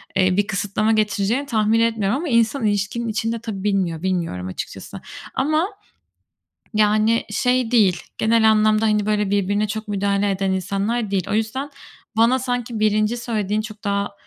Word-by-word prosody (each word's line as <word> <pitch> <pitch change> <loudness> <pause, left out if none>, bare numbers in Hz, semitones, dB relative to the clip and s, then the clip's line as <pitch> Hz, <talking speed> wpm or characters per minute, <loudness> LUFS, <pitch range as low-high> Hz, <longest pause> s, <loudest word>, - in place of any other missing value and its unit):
eee, 185 0 +2
bir 205 0 +2
kısıtlama 205 +2 0
getireceğini 215 +4 +1
tahmin 220 -3 +2
etmiyorum 225 0 +1
ama 335 - -4
insan 230 +1 +2
ilişkinin 210 +3 -1
içinde 225 +1 -2
tabii 215 -4 -6
bilmiyor, 190 -6 0
bilmiyorum 170 - -2
açıkçası 95 - -7 0.3
ama 310 +6 +1 1.1
yani 215 +2 +2
şey 250 +2 +1
değil, 195 -7 +3 0.2
genel 220 0 +4
anlamda, 215 0 +3
hani, 210 -1 +2
böyle, 210 -2 0
birbirine 205 +1 +1
çok 215 +1 -5
müdahale 200 0 0
eden 195 0 -1
insanlar 200 +4 -1
değil. 190 -1 -1
O - - -1
yüzden, 225 +6 -1 0.5
bana 235 +3 +4
sanki 245 -3 -3
1'nci 215 +2 +2
söylediğin 215 -3 -1
çok 215 -1 -10
daha 200 -1 -1
215 Hz, 150 wpm, -21 LUFS, 200-230 Hz, 1.1 s, genel